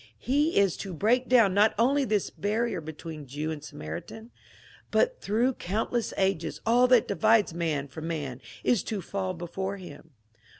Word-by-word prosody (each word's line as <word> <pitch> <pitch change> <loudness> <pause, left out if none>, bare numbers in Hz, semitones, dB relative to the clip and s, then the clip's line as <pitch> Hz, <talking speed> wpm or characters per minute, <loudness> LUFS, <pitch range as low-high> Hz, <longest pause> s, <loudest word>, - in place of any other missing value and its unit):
He 290 +5 +1
is 200 -3 +3
to 190 -3 -6
break 245 +9 +2
down 230 -7 +5
not 210 +2 +4
only 270 +5 +3
this 210 -5 0
barrier 210 -2 -1
between 155 -1 -8
Jew 150 +4 -3
and 150 -2 -6
Samaritan, 150 - -8 0.6
but - - +1
through 235 +6 +1
count 210 +2 -3
less 235 -3 0
ages 190 -4 0
all 245 +3 +5
that 250 -2 +5
divides 220 -5 +3
man 160 -4 -1
from 160 +4 -7
man 145 -6 -4 0.2
is 235 -7 +3
to 215 - -3
fall 190 -2 -3
before 190 +3 -4
him. 165 -3 -11
195 Hz, 165 wpm, -28 LUFS, 160-230 Hz, 0.6 s, down